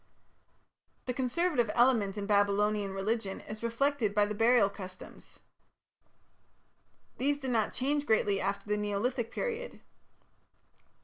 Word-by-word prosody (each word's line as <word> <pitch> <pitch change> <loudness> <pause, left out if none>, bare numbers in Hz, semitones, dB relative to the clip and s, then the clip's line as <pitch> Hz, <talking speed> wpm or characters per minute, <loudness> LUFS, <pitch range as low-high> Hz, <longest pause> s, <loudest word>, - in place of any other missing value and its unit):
The 250 - -2
conservative 255 0 0
element 230 -5 +3
in 205 - -3
Babylonian 205 0 +2
religion 195 +1 -2
is 215 0 -8
reflected 235 -2 0
by 205 0 +4
the 210 - -3
burial 225 0 +4
customs. 185 -2 -11 1.8
These 285 +2 +1
did 265 -3 -4
not 220 -3 +1
change 285 +3 -1
greatly 205 -3 +2
after 200 +1 -2
the 210 0 0
Neolithic 220 +4 -1
period. - - -4
220 Hz, 115 wpm, -31 LUFS, 205-255 Hz, 1.8 s, by